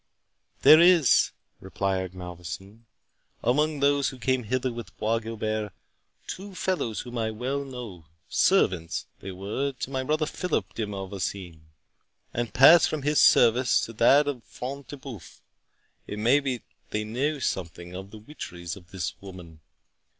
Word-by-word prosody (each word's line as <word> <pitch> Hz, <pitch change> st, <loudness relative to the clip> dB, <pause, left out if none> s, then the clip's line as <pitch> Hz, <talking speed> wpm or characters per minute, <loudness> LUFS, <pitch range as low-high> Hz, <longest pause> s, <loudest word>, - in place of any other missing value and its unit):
"There 155 Hz, -, +9 dB
is," 170 Hz, -5 st, +6 dB, 0.3 s
replied 95 Hz, 0 st, -2 dB
Malvoisin, 90 Hz, +5 st, -9 dB, 0.6 s
"among 150 Hz, +4 st, +1 dB
those 140 Hz, 0 st, +3 dB
who 130 Hz, -, -10 dB
came 130 Hz, 0 st, 0 dB
hither 130 Hz, +2 st, -1 dB
with 120 Hz, -1 st, -9 dB
Bois 115 Hz, +1 st, +1 dB
Guilbert, 110 Hz, -2 st, -3 dB, 0.5 s
two 195 Hz, 0 st, -7 dB
fellows 180 Hz, -, -1 dB
whom 120 Hz, -1 st, -6 dB
I 110 Hz, -1 st, 0 dB
well 130 Hz, +6 st, -3 dB
know; 120 Hz, -, -9 dB, 0.2 s
servants 90 Hz, -, +2 dB
they 95 Hz, -, -7 dB
were 105 Hz, +9 st, -3 dB
to 130 Hz, +1 st, -6 dB
my 130 Hz, -1 st, -1 dB
brother 155 Hz, +3 st, 0 dB
Philip 110 Hz, -, -2 dB
de 110 Hz, -2 st, -3 dB
Malvoisin, 95 Hz, -4 st, -5 dB, 0.7 s
and 120 Hz, -1 st, -2 dB
passed 155 Hz, +6 st, +7 dB
from 155 Hz, -3 st, -3 dB
his 150 Hz, +1 st, +2 dB
service 120 Hz, +2 st, +5 dB
to 115 Hz, -, -5 dB
that 140 Hz, +6 st, +5 dB
of 130 Hz, -5 st, -3 dB
Front 135 Hz, +2 st, -7 dB
de 145 Hz, -, -8 dB
Bœuf—It 120 Hz, -, -13 dB
may 120 Hz, +7 st, +4 dB
be 130 Hz, -5 st, -3 dB, 0.3 s
they 105 Hz, -, -2 dB
know 130 Hz, +8 st, -1 dB
something 90 Hz, -7 st, -4 dB
of 95 Hz, +1 st, -7 dB
the 110 Hz, -, -11 dB
witcheries 90 Hz, -, -8 dB
of 90 Hz, -3 st, -15 dB
this 95 Hz, -3 st, -4 dB
woman." 90 Hz, -5 st, -11 dB
115 Hz, 145 wpm, -26 LUFS, 95-140 Hz, 0.7 s, There